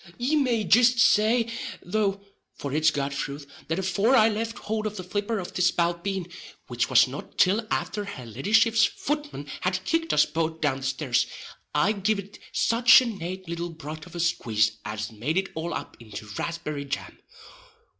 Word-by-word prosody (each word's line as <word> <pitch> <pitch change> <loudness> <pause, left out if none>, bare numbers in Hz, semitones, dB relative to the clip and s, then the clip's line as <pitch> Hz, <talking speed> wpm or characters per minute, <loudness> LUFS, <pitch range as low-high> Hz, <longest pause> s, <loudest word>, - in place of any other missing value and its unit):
Ye 260 +6 +1
may 250 -7 +2
jist 245 +3 +5
say, 225 +1 +4 0.4
though 200 +1 0 0.3
(for 140 -1 -5
it's 155 +1 +4
God's 140 -1 -2
thruth), 140 0 -4 0.2
that 165 - -1
afore 195 +6 +2
I 220 -3 +6
left 225 +1 -3
hould 215 0 -2
of 210 0 -6
the 185 - -5
flipper 205 +4 -2
of 180 -3 -6
the - - -2
spalpeen 175 +2 +1 0.4
(which - - -1
was - - +6
not - - -9
till 210 +4 +3
afther 210 -1 -2
her 130 -11 -8
leddyship's 220 - +3
futman 295 - -2
had 185 +1 -1
kicked 330 - 0
us - - +5
both 160 -1 -2
down 145 -4 +1
the 135 - -9
stairs), 130 -2 0 0.5
I 150 +8 +3
giv'd 200 -1 -2
it - - -28
such 230 0 +6
a - - -2
nate 185 -4 -5
little 170 +1 -4
broth 155 0 -8
of 175 - -13
a - - -4
squaze 115 -10 +1
as 105 +1 -4
made 125 - -2
it 190 0 0
all 165 +2 -4
up - - -6
into 110 -2 -9
raspberry 150 -4 -4
jam. 140 0 -5
185 Hz, 180 wpm, -26 LUFS, 150-215 Hz, 0.5 s, I